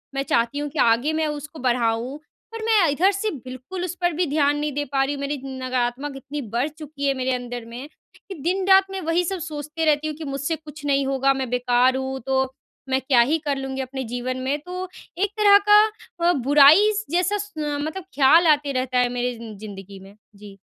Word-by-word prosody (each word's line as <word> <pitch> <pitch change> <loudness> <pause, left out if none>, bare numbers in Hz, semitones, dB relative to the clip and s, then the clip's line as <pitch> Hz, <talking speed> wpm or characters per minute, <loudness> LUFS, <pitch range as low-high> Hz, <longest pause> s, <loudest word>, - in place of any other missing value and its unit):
मैं 275 - 0
चाहती 235 +3 0
हूँ 295 - -3
कि 295 +1 -6
आगे 240 +7 +3
मैं 315 0 0
उसको 300 +1 -6
बढ़ाऊँ, 240 +1 0 0.3
पर 455 -1 -6
मैं 425 -7 +4
इधर 360 +8 +3
से 415 +2 -2
बिल्कुल 260 +7 -7
उस 360 0 -5
पर 350 -1 +1
भी 355 +4 0
ध्यान 290 0 +2
नहीं 300 0 -2
दे 290 +1 -2
पा 270 -1 +2
रही 275 - -1
हूँ। 280 - -7
मेरी 285 +1 -2
नकारात्मक 260 +1 -3
इतनी 285 +2 -6
बढ़ 250 +5 +1
चुकी 300 -2 -6
है 275 - +3
मेरे 260 -1 -1
अंदर 245 -1 -5
में, 245 +5 -8 0.4
कि 385 - -6
दिन-रात 380 +4 +3
मैं 385 -1 -4
वही 330 +2 +1
सब 380 +1 -3
सोचती 305 0 -4
रहती 305 0 +2
हूँ 305 - -4
कि, 320 - -8
"मुझसे 280 +3 -2
कुछ 310 -1 -12
नहीं 275 -1 +2
होगा। 275 0 +2
मैं 265 -2 -3
बेकार 250 +1 +2
हूँ, 265 0 -3
तो 265 +1 -1 0.4
मैं 265 0 +2
क्या 255 -3 +4
ही 300 +7 +2
कर 280 -1 0
लूँगी 270 0 -4
अपने 265 +1 -5
जीवन 255 +1 -3
में?" 270 +3 -1
तो 365 +3 -6 0.3
एक 400 +1 +1
तरह 410 -1 +7
का 420 +1 +8 0.5
अ, - - +4
बुराई 290 - +6
स 425 +1 -3
जैसा 365 +4 +1
स 415 +1 -7
अ, 295 -1 -2
मतलब 315 +5 -4
ख़्याल 310 +5 +5
आते 295 -2 +3
रहता 255 -1 -1
है 245 0 +2
मेरे 245 0 -2
ज़िं 225 -2 -9
ज़िंदगी 195 -2 -10
में। 195 +2 -15 0.2
जी। 200 -1 -13
280 Hz, 220 wpm, -23 LUFS, 255-320 Hz, 0.5 s, का